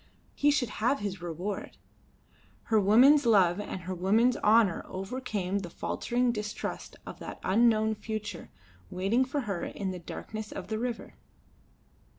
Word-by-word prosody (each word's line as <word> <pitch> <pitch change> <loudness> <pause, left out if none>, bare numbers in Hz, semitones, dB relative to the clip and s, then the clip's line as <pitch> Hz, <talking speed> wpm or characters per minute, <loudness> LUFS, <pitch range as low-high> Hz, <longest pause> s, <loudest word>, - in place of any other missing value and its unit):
He 290 - +2
should 270 -5 +1
have 245 +5 +3
his 195 -2 -4
reward. 175 +4 -5 0.9
Her 220 -2 +2
woman's 245 +8 +6
love 190 -4 +4
and 195 -2 -5
her 185 +2 -5
woman's 215 +7 +3
honour 215 -4 +3
overcame 195 -1 -3
the 180 -3 -7
faltering 245 +7 -1
distrust 210 -2 -5
of - - -9
that - - -8
unknown 220 +1 +3
future 210 -3 -6 0.4
waiting 195 +8 +1
for 280 +2 -2
her 200 -7 -3
in 195 -2 -4
the 180 - -6
darkness 215 +5 -7
of 190 0 -7
the 220 0 -2
river. 240 -1 -4
210 Hz, 145 wpm, -29 LUFS, 190-235 Hz, 0.9 s, woman's